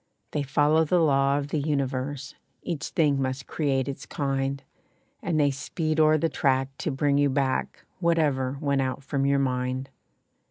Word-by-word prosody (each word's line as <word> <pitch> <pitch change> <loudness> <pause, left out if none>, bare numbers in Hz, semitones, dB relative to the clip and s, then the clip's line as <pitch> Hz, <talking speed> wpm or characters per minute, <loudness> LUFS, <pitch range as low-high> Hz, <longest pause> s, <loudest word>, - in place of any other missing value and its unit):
They 150 - -1
follow 145 +3 +3
the 170 +3 +2
law 140 -3 +3
of 145 0 -3
the 155 - 0
universe 140 -1 -2 0.3
Each 160 -5 -3
thing 145 -4 +2
must 130 0 -2
create 135 -4 0
its 140 - -6
kind, 135 -1 -2 0.6
And 165 -3 0
they 145 -1 +4
speed 155 +3 -2
o'er 155 0 +5
the 165 - +1
track 135 -4 +1
to - - -2
bring 140 0 +1
you 145 0 +3
back 135 -1 -1
Whatever 145 -6 +1
went 140 -1 +1
out 130 +1 -3
from 135 0 -1
your 140 0 +3
mind. 130 0 -1
140 Hz, 165 wpm, -26 LUFS, 135-150 Hz, 0.6 s, o'er